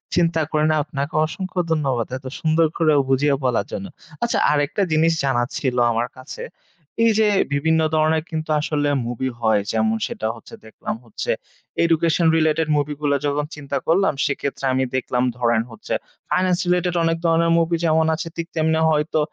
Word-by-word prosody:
চিন্তা 170 -2 +2
করি 155 -1 +1
নাই, 155 - +2
আপনাকে 140 0 -4
অসংখ্য 185 +4 -5
ধন্যবাদ। 135 -7 0
এত 130 - -16
সুন্দর 160 +1 +3
করে 155 -2 +3 0.2
বুঝিয়ে 140 +2 +3
বলার 125 -2 +1
জন্য। 195 - -4 0.4
আচ্ছা, 235 - +1
আরেকটা 150 +6 0
জিনিস 160 +1 +3
জানার 120 -3 +1
ছিল 130 -3 -1 0.2
আমার 115 +1 0
কাছে। 130 - -9 0.6
এই 230 - +5
যে 220 - +4 0.3
বিভিন্ন 160 +3 +2 0.2
ধরনের 155 0 +2
কিন্তু 160 -1 -4
আসলে 145 -1 0 0.2
মুভি 125 +2 -2
হয়, 110 -2 +3
যেমন 110 0 +1
সেটা 110 - -4
হচ্ছে 115 - -15
দেখলাম 110 - -5
হচ্ছে 110 - -3 0.5
এডুকেশন 170 0 +2
রিলেটেড 155 0 +2
মুভিগুলা, 145 0 0
যখন 145 +1 0
চিন্তা 140 -1 -4
করলাম, 185 +3 +3
সেক্ষেত্রে 140 -1 -3
আমি 130 0 +1
দেখলাম 125 -1 0
ধরেন 120 -2 +2
হচ্ছে 115 - -6 0.4
ফাইনান্স 185 -1 +2
রিলেটেড 180 0 +1
অনেক 165 0 +1
ধরনের 165 0 +3
মুভি 165 +1 +1
যেমন 160 0 +3
আছে, 165 - -5 0.3
তেমনি 160 0 +2
হয়তো 155 +1 +1
155 Hz, 160 wpm, -21 LUFS, 135-165 Hz, 0.6 s, এই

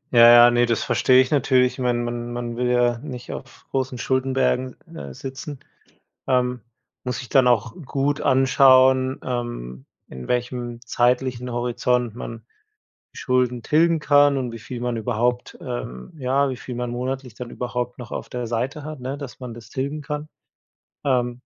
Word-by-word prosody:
Ja, 120 0 +9
ja, 120 0 +8
ne, 120 0 +3
das 115 -2 0
verstehe 130 0 +4
ich 130 - -1
natürlich. 130 -3 +3
Ich - - -12
meine, 125 -1 +1
man 120 0 -4
man 120 -1 -4
will 125 +1 0
ja 120 -1 +2
nicht 125 -3 -8
auf - - -10
großen 130 -1 -1
Schuldenbergen, 130 0 0 0.2
äh, - - -7
sitzen, 135 +1 -7 0.7
ähm, 125 -1 +1 0.4
muss 125 -1 -3
sich 125 - -9
dann 135 -3 +4
auch 115 -2 +2
gut 140 +2 0
anschauen, 130 0 +4
ähm, 120 - -5 0.2
in 65 -1 -9
welchem 120 -1 -2
zeitlichen 125 0 0
Horizont 120 -1 0
man 115 -2 -7 0.7
Schulden 125 -1 0
tilgen 165 +5 +3
kann, 145 -1 +5
und 125 -3 -2
wie 115 - -7
viel 120 +2 -7
man 120 -1 -1
überhaupt, 120 +3 -1
ähm, - - -6
ja, 135 +1 +1
wie 130 - -4
viel 125 - -7
man 120 0 -3
monatlich 125 +1 -4
dann 125 +1 -7
überhaupt 125 0 -4
noch 120 -2 -9
auf - - -5
der 125 -1 -4
Seite 125 +6 -3
hat, 155 -2 -7
ne, 130 +2 -4
dass 140 -3 -9
man 125 -2 -7
das 115 -1 -13
tilgen 140 +3 -3
kann. 150 +1 -5 0.8
Ähm. 125 -3 0
125 Hz, 165 wpm, -23 LUFS, 120-130 Hz, 0.8 s, Ja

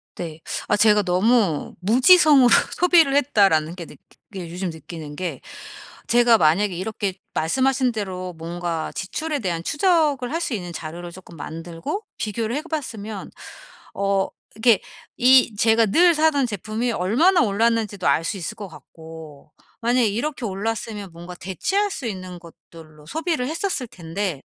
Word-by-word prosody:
네. 165 -3 -7 0.3
아 - - +3
제가 210 0 +4
너무 190 -2 +1
'무지성으로 260 - +6 0.3
소비를 335 -6 +4
했다' 250 -9 +4
라는 155 +1 0
게 175 -2 -7
느끼 - - -16 0.3
그러니까 180 -4 -7
요즘 180 +1 -3
느끼는 160 -1 -9
게 165 -5 -5 0.7
제가 240 -1 +5
만약에 185 +4 +2
이렇게 195 +1 -3 0.2
말씀하신 260 - +1
대로 185 -4 -5
뭔가 170 0 -4
지출에 300 +10 -3
대한 175 -7 -2
추적을 295 - +1
할 - - +1
수 - - -4
있는 175 -4 -6
자료를 170 +2 -7
쪼끔 180 -1 -13
만들고 165 - -6
비교를 220 +2 -3
해 295 - -1
봤으면 225 - -6 0.6
어 195 -1 +1 0.3
이렇게 225 -2 +4 0.4
이 250 -3 +5
제가 225 +1 +4
늘 345 - +5
사던 305 -3 +3
제품이 220 +3 -3
얼마나 310 - +3
올랐는지도 215 - 0
알 165 - +3
수 205 - -2
있을 190 +4 -5
것 210 -3 -7
같고 160 -3 -13 0.3
만약 240 +2 +2
이렇게 240 +5 -1
올랐으면 210 0 -4
뭔가 175 +2 -10
대체할 385 - -1
수 275 - -6
있는 185 -4 -6
것들로 160 -2 -16
소비를 320 - -2
했었을 320 -4 -2
텐데 175 -4 -4
205 Hz, 320 characters per minute, -22 LUFS, 175-250 Hz, 0.7 s, 무지성으로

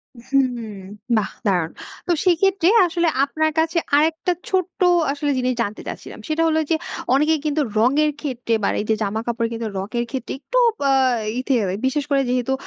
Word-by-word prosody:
হু, 275 +4 0 0.2
হুম। - - -6 0.6
বাহ! 210 - 0 0.2
দারুণ। 175 -5 +1 0.4
তো - - +1
সেইক্ষেত্রে 365 0 +3 0.2
আসলে 345 -1 0 0.2
আপনার 315 +2 0
কাছে 325 +1 +1 0.2
আরেকটা 320 +4 +2 0.2
ছোট্ট 370 -2 -1 0.3
আসলে 290 0 -1
জিনিস 255 0 +1
জানতে 215 -2 -3
চাচ্ছিলাম। - - -8
সেটা 315 +1 0
হলো 315 0 +2
যে 325 - +3 0.4
অনেকেই 305 +3 +3
কিন্তু 300 0 +1 0.2
রঙের 280 +7 +3
ক্ষেত্রে 250 -5 -2
বা - - +3
এই 210 - -2
যে, 220 - +4
জামাকাপড় 230 +3 -2
কিন্তু 225 -1 -3
রঙের 235 +5 -2
ক্ষেত্রে 260 -3 -4
একটু - - -3 0.2
বা 275 -1 +2 0.5
ই - - 0
তে 270 - +2 0.3
বিশেষ 285 +2 0
করে 275 -1 +4
যেহেতু 250 +1 0
280 Hz, 170 wpm, -21 LUFS, 235-320 Hz, 0.6 s, যে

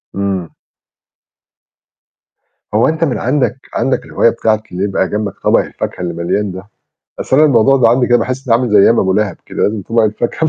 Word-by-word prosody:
إمم. 95 -4 -2 2.2
هو 110 +3 +3
أنت 160 +1 -1
من 140 -6 0
عندك 130 0 0 0.2
عندك 135 - -1
الهواية 115 - +2
بتاعة 110 -2 -1
اللي 90 +2 -3
يبقى 95 -2 -1
جنبك 105 -1 -3
طَبَق - - +3
الفاكهة - - -5
اللي 85 -1 -3
مليان 90 +4 -2
ده؟ 95 +1 -8 0.6
أصل 130 - 0
أنا 155 +1 +6
الموضوع 135 0 +4
ده 120 -3 +4
عندي 125 +1 +2
كده 120 -1 +3
باحِس 130 +3 -4
إنّي 115 - +5
عامل 125 -2 -2
زي 105 - +5
أيام 115 +4 +5
أبو 95 -1 +1
لَهَب 105 -3 -1
كده، - - -4
لازم 105 -1 0
طَبَق 115 +3 0
الفاكهة. 120 +8 -1
110 Hz, 190 wpm, -15 LUFS, 100-125 Hz, 2.2 s, أنا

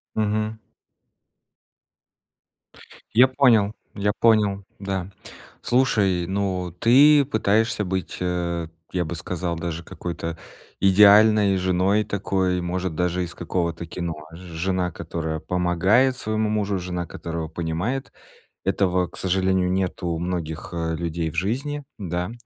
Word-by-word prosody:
Мгм. 110 0 0 2.6
Я 125 +4 +7
понял. 120 -6 +3 0.2
Я 105 0 0
понял. 105 -3 +3 0.2
Да. 95 -2 -3 0.5
Слушай, 100 -9 +2
ну 95 -2 -2
ты 140 - +6
пытаешься 110 -2 +1
быть, 95 0 -3
э, 85 -2 -2 0.2
я 90 -2 -1
бы 85 - -4
сказал, 85 +1 -3
даже 85 0 -4
какой-то 85 -1 -5 0.4
идеальной 105 +1 +6
женой 95 +3 +2
такой, 95 -3 -1
может 90 -1 -3
даже 90 +1 0
из 85 -1 -6
какого-то 85 -1 -3
кино. 85 -1 -4 0.2
Ж 80 - -9
жена, 90 +1 -2
которая 80 -1 -4
помогает 90 +10 +2
своему 110 -1 -1
мужу, 105 -2 0
жена, 90 -1 -4
которая 85 0 -5
его 80 - -6
понимает. 90 +11 -3 0.5
Этого, 90 -2 +1
к - - -13
сожалению, 95 -1 +1
нету 95 -1 -1
у 85 -1 -1
многих, 85 -2 -4
э, 80 -1 -2
людей 85 0 -2
в 80 - -11
жизни, 140 - -2
да. 90 0 -3
95 Hz, 125 wpm, -23 LUFS, 85-105 Hz, 2.6 s, Я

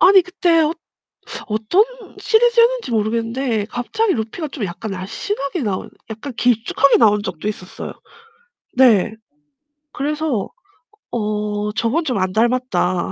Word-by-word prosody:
아니 385 0 +7
그때 350 -2 +2
어 305 - +1 0.8
어떤 220 - +3 0.3
시리즈였는지 475 - +3
모르겠는데 225 +1 0
갑자기 370 - -1
루피가 235 +8 -4
좀 265 -6 -5
약간 180 +4 -5
날씬하게 275 - -3
나온 200 -4 -3 0.2
약간 225 +6 -6
길쭉하게 245 +3 +3
나온 210 -2 +4
적도 185 -2 -5
있었어요. 190 -3 -6 0.8
네. 225 -5 +5 0.8
그래서 295 -6 -1 0.6
'어 210 -1 -2
저건 245 +11 0
좀 250 -7 -1
안 185 0 0
닮았다.' 230 -6 +1
235 Hz, 270 characters per minute, -19 LUFS, 210-310 Hz, 0.8 s, 아니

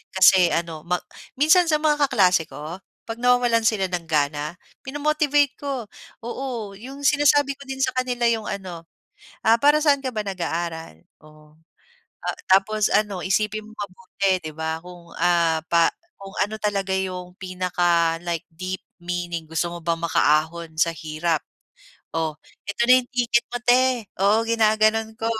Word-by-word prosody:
Kasi 190 -1 +6
ano 165 -2 -3
ma 180 - +2 0.4
minsan 335 +4 +5
sa 315 - +3
mga 295 -2 +2
kaklase 185 -9 +3
ko, 155 +5 -8 0.3
'pag 225 - -5
nawawalan 245 -2 +3
sila 205 -4 +1
ng 175 -2 -3
gana, 150 0 -1 0.3
minomotivate 290 -1 +1
ko. 275 -4 -3 0.4
Oo, 240 -3 -5
'yong 270 +5 -9
sinasabi 290 0 +4
ko - - -10
din 265 0 -5
sa 260 - +2
kanila 250 -1 -1
'yong 225 -2 -1
ano, 180 -4 -6 0.6
"Ah, 225 - +6
para 295 +3 +5
sa'n 285 -3 +3
ka 260 - -2
ba - - -1
nag-aaral?" 170 - -4 0.2
Oh, 155 0 -19 0.7
ah, - - -2
tapos 210 +2 +3
ano, 205 -3 +1
isipin 215 +2 0
mong 220 - -16
mabuti, 200 0 -2
'di 155 - -5
ba, 160 0 -3
kung 175 -1 -13
ah, 170 -2 +2
pa 170 -1 +5 0.3
kung 195 0 -10
ano 215 +2 -7
talaga 195 -2 -1
yung 180 -1 -4
pinaka, 175 -3 +1
like 170 -2 -3
deep 185 +3 -5 0.2
meaning. 175 -1 -4
Gusto 165 +1 -1
mo 175 - -7
bang 165 0 0
makaahon 160 0 +1
sa 165 - +3
hirap? 160 0 -2 0.7
"O, 160 -2 -1 0.3
Eto 200 - -1
na 255 +1 +7
'yong 245 - -14
ticket 235 -1 +2
mo 245 - -1
'te." 245 -2 +3 0.2
Oo 215 +3 +3
ginaganon 220 0 +2
ko, 225 - -3
195 Hz, 155 wpm, -23 LUFS, 170-245 Hz, 0.7 s, na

